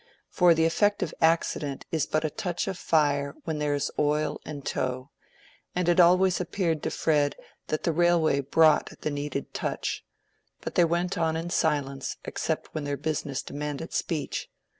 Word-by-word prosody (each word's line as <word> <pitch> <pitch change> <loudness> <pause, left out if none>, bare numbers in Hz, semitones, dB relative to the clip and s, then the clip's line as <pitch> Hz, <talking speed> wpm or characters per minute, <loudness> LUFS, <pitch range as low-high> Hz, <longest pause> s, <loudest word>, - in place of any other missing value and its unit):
For 175 -2 +5
the 160 0 +3
effective 195 0 +1
accident 160 -3 +1
is 160 -4 0
but 155 0 0
the 155 - -1
touch 175 +3 -3
of 195 - -2
fire 145 -4 +1
where 160 - -2
there 145 -1 +1
is 145 - -1
oil 150 +1 +1
and 145 -3 -7
tow; 130 +2 -2 0.6
and 180 -1 0
it 175 +1 +4
always 180 +1 +5
appeared 170 -3 -1
to - - -1
Fred 145 -3 +1 0.3
that 155 - -2
the 170 - +2
railway 165 -3 +3
brought 155 +3 +3
the 155 - -1
needed 145 -1 -4
touch. - - -3 0.6
But - - -6
they 175 - +5
went 175 +2 -1
on 160 -1 +1
in 170 +1 -4
silence 140 -5 0
except - - -3
when 155 - -3
their 145 0 -2
business 145 -2 -2
demanded 150 +2 -5
speech. 155 -5 -2
155 Hz, 165 wpm, -27 LUFS, 145-170 Hz, 0.6 s, For